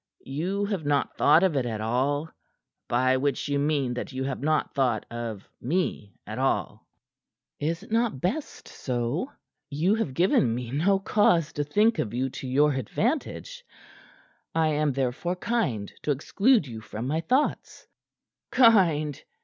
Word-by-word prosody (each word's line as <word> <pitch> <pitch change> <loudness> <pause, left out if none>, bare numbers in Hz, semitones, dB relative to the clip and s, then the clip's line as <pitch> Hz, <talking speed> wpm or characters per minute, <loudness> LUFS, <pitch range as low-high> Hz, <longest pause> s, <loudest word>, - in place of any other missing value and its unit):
You 180 +9 -2
have 200 -5 -2
not 145 -1 0
thought 155 +5 +5
of 185 -5 +2
it 135 - +1
at 110 -2 -3
all 135 +7 0 0.6
by 130 +2 +3
which 140 0 -1
you 145 0 0
mean 140 -4 0
that 125 +3 -5
you 130 0 -3
have 135 -2 -3
not 155 +1 0
thought 125 -6 +1
of 115 -4 -5
me 130 - -2
at - - -6
all." - - -1 0.7
"Is't 165 +7 -3
not 225 - +1
best 225 - -3
so? 125 - -3 0.4
You 155 +7 +1
have 220 - -2
given 135 -9 +3
me 120 -1 -5
no 175 +8 +2
cause 180 -5 +2
to 145 - -1
think 210 +10 +2
of 110 +1 -2
you 130 +1 -1
to 130 - -7
your 145 +3 +3
advantage. 270 - -2 0.9
I 160 -1 +3
am 150 -1 +1
therefore 135 +7 -1
kind 180 - -2
to - - -5
exclude 195 - +2
you 115 -4 -8
from 110 +2 -6
my 155 +5 0
thoughts." 260 - -1 0.6
"Kind?" 170 - +4
145 Hz, 150 wpm, -26 LUFS, 130-185 Hz, 0.9 s, thought